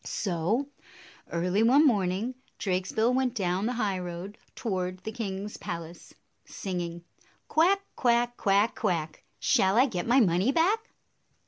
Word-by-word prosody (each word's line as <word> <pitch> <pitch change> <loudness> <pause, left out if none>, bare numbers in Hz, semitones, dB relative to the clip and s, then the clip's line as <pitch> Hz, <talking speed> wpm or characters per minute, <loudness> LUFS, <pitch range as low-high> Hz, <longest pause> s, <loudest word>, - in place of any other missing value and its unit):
So, 200 - -1 0.6
early 180 +4 +1
one 265 +7 +5
morning, 205 -1 +1 0.2
Drakesbill 200 +5 0
went 255 -1 0
down 190 0 0
the 250 - -1
highroad 190 -3 -3 0.2
toward 185 -5 -2
the 220 - -4
king's 205 -2 -5
palace, 170 0 -7 0.3
singing, 175 -3 -5 0.4
"Quack, 380 +5 +3
quack! 240 -1 +2
Quack, 200 +1 +2
quack! 165 -7 -2 0.2
Shall 190 +3 +3
I 255 - +6
get 185 -8 -3
my 250 +3 +5
money 190 +2 +3
back?" 400 +9 +1
205 Hz, 125 wpm, -28 LUFS, 180-245 Hz, 0.6 s, I